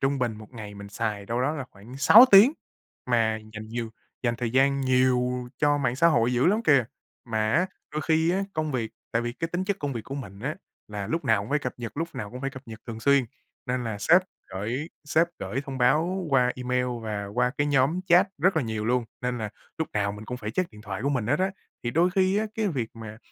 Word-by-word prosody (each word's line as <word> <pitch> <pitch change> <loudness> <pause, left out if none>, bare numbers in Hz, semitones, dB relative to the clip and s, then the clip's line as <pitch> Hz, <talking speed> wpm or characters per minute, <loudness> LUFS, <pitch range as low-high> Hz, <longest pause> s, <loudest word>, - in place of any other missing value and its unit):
trung 135 +1 +1
bình 120 -4 -1
một 110 0 -12
ngày 105 -4 -8
mình 100 0 -9
xài 105 -1 -3
đâu 115 +3 -1
đó 145 - +1
là 140 -4 -4
khoảng 110 +6 -12
6 220 - +9
tiếng 205 +8 +9 0.6
mà 110 -2 +2 0.2
dành 110 0 -7
nhiều 115 0 -4 0.3
dành 120 -2 0
thời 120 -1 -2
gian 135 +2 +3
nhiều 125 -1 +2
cho 145 -1 +3
mạng 125 -3 0
xã 165 - +5
hội 120 -5 +2
dữ 125 - +3
lắm 210 +5 +3
kìa. 140 -5 +5 0.4
Mà 110 -2 0
á, 175 +3 +3 0.3
đôi 155 - -2
khi 160 +2 +2
á, 190 +2 0
công 155 -1 -1
việc 115 -4 -2 0.2
tại 115 - +1
vì 120 0 -3
cái 165 +7 -4
tính 175 +2 -2
chất 200 0 -1
công 145 -1 -3
việc 115 - -4
của 135 - -6
mình 100 -8 -8
á 140 +6 -3 0.3
là 105 -2 -5
lúc 165 +8 -2
nào 110 -5 +3
cũng 105 - -9
phải 150 - +3
cập 125 -4 -4
nhật, 120 +1 -7
lúc 165 +2 -2
nào 105 - -5
cũng 125 - -8
phải 135 0 -2
cập 130 -1 -10
nhật 110 -1 -9
thường 115 -2 -6
xuyên 140 +1 +4 0.4
nên 125 -1 -1
là 110 -3 -3
sếp 165 - +5 0.2
gởi 115 - -4
sếp 160 +3 +2
gởi 100 +8 -3
thông 135 -2 -6
báo 160 +9 +2
qua 125 -2 +3
email 125 0 0 0.2
và 105 -2 -3
qua 125 +1 +2
cái 145 - +2
nhóm 145 +4 +2
chat 180 +3 +5
rất 185 +4 +3
là 160 - +3
nhiều 110 -1 -3
luôn, 125 +1 +1 0.2
nên 125 0 -1
là 110 -2 -4 0.3
lúc 160 - -1
nào 100 -1 0
mình 105 +1 -9
cũng 125 - -4
phải 110 -3 -5
check 175 +10 -1
điện 105 -1 -14
thoại 100 0 -5
của 140 - +1
mình 125 -7 -1
hết 145 +6 +2
á. 190 +1 +2 0.3
Thì 120 - 0
đôi 170 +7 +3
khi 190 +1 +2
á, 220 - 0
cái 220 -2 0
việc 125 -10 -2
mà 110 -1 -9
125 Hz, 250 wpm, -26 LUFS, 110-150 Hz, 0.6 s, 6